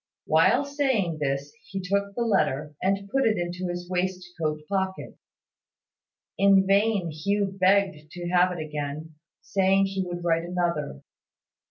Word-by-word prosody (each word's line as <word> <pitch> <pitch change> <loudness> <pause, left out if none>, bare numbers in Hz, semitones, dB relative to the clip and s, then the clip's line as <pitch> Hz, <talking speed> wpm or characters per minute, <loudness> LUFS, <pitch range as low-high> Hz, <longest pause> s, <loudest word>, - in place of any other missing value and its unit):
While 165 - +4
saying 260 - 0
this, 140 0 -2 0.2
he 195 - -4
took 200 +2 -1
the 240 - 0
letter, 155 - 0
and 195 +1 0
put 270 0 +2
it 215 - +2
into 175 +1 -3
his 175 0 -5
waistcoat 180 -4 -2
pocket. 190 -1 -2 1.2
In 195 -1 +5
vain 200 -3 +2
Hugh 195 +5 -1
begged 185 -5 +2
to 175 -1 -5
have 180 +1 +4
it 180 - -5
again, 150 +1 -5 0.3
saying 195 0 +2
he 195 0 -2
would 175 -1 -5
write 165 -1 +1
another. 170 - -2
180 Hz, 140 wpm, -26 LUFS, 165-195 Hz, 1.2 s, In